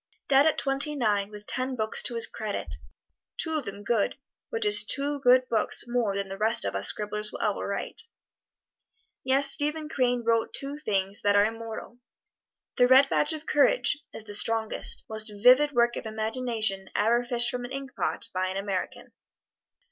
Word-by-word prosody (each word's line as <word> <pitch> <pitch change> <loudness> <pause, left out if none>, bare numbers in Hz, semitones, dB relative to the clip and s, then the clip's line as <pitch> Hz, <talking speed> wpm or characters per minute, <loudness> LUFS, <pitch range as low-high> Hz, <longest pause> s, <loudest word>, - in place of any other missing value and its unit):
Dead 275 +2 +5
at 315 - +1
twenty 280 +2 +2
nine, 205 -6 0
with 210 0 -11
ten 255 +3 -2
books 220 -2 0
to 240 - -2
his 230 - +4
credit, 215 -2 -5 0.6
two 320 -1 -3
of 300 -4 -2
them 200 +1 -8
good, 225 +3 0 0.3
which 225 -1 -1
is 210 0 +5
two 285 +5 0
good 255 -1 +4
books 220 -3 0
more 240 -5 -1
than 195 -1 -3
most 220 - +3
of 100 - -3
us 95 0 0
scribblers 210 0 -2
will - - -8
ever 210 - -1
write. 200 0 -4 1.2
Yes, 275 +1 +3
Stephen 300 +2 +1
Crane 245 -4 0
wrote 230 -1 0
two 280 +2 0
things 195 -6 -2
that 205 0 +2
are 205 0 +5
immortal. 225 +1 -7 0.8
"The 245 - +5
Red 265 +2 +6
Badge 300 +2 +1
of 310 0 -8
Courage" 295 - +2
is - - -9
the 210 -1 -8
strongest, 225 +1 0
most 215 -1 -3
vivid 250 +8 +5
work 240 -2 +2
of - - -6
imagination 220 -3 -3
ever 235 +3 +2
fished 240 0 +1
from 250 0 -5
an 245 - -8
ink 275 0 -7
pot - - -1
by 185 0 -1
an 190 +1 -4
American. 195 -1 -4
230 Hz, 180 wpm, -27 LUFS, 210-265 Hz, 1.2 s, Red